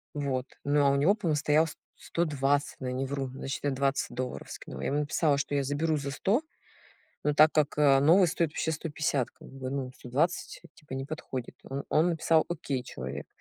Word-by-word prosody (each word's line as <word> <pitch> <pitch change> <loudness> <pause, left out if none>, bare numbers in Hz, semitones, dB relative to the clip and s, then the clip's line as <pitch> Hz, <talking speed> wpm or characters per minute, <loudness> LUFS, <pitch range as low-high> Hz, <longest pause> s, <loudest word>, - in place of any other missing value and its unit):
Вот, 135 -3 -1 0.2
ну, 145 0 +3
а - - +6
у - - +2
него 155 +9 +4
помо 175 -8 0
стоял 150 +1 +3
с - - -8 0.2
сто 170 - -1
двадцать, 145 -1 +1
но 130 - -4
я 125 - -2
не 135 +1 -1
вру, 135 0 -2
значит 135 +1 -5
я 145 - +1
20 135 +1 0
долларов 125 - -4
скинула. - - -8
Я - - -1
ему 145 +2 +1
написала, 145 0 +2
что 145 0 -1
я 140 - +2
заберу 155 +3 0
за 140 -1 -3
100, 200 - +1 0.8
но 150 - +2
так 155 +2 +7
как, 150 -2 +1
а, 140 -2 +6
новый 175 +6 +6
стоит 165 -1 +1
вообще 160 - -1
150, 150 -5 -1
как - - -15
бы, 130 -1 -6
ну, 135 -2 -3
120 140 +8 -1
типа 150 -4 -12
не 135 0 -3
подходит. 130 -5 -6
Он 135 +1 -5
он 165 +3 +4
написал 160 -1 +3
"окей" 140 -6 -2
человек. 70 - -6
145 Hz, 210 wpm, -29 LUFS, 135-155 Hz, 0.8 s, так